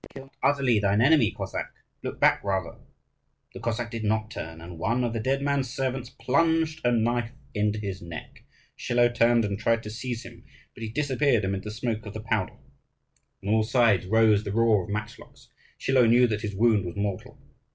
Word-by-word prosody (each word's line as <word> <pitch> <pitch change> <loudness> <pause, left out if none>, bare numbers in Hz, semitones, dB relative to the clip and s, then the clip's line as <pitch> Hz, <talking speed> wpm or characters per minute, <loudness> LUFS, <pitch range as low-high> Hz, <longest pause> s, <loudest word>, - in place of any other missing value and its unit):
Kill 135 - -8
not 135 - -22 0.2
utterly 125 -6 +2
thine 100 0 +2
enemy, 135 -2 +5
Cossack: - - -4 0.3
look - - -6
back - - +4
rather! 95 -3 -2 0.7
The - - -8
Cossack 115 0 -3
did 115 -2 -4
not 110 +1 0
turn, 80 -6 -7
and 85 0 -10
one 115 +6 0
of 120 -1 -1
the 115 - -2
dead 135 +5 0
man's 140 -3 0
servants 130 -1 -3
plunged 160 +3 +1
a 120 - +3
knife 120 0 +1 0.2
into 105 0 0
his 100 -3 -5
neck. 85 -1 -9 0.3
Schilo 120 0 +2
turned 120 -1 +3
and 100 -1 -3
tried 115 +1 +1
to 105 - -7
seize 120 +1 -5
him, 115 -1 -12 0.3
but - - -13
he 110 - -4
disappeared 135 -3 +1
amid 95 0 -2
the 105 - -7
smoke 110 0 -3
of 105 - -8
the - - -4
powder. 110 -3 -1 0.9
On 100 +2 0
all 110 - +4
sides 110 -5 +2
rose 110 0 +4
the 100 - -4
roar 110 -4 +3
of - - -13
matchlocks. 105 +1 -7 0.3
Schilo 130 -3 +3
knew 120 +2 +6
that 105 -3 -1
his 105 -3 -4
wound 110 -1 +3
was 85 -2 -6
mortal. 100 -2 -4
115 Hz, 195 wpm, -26 LUFS, 105-120 Hz, 0.9 s, knew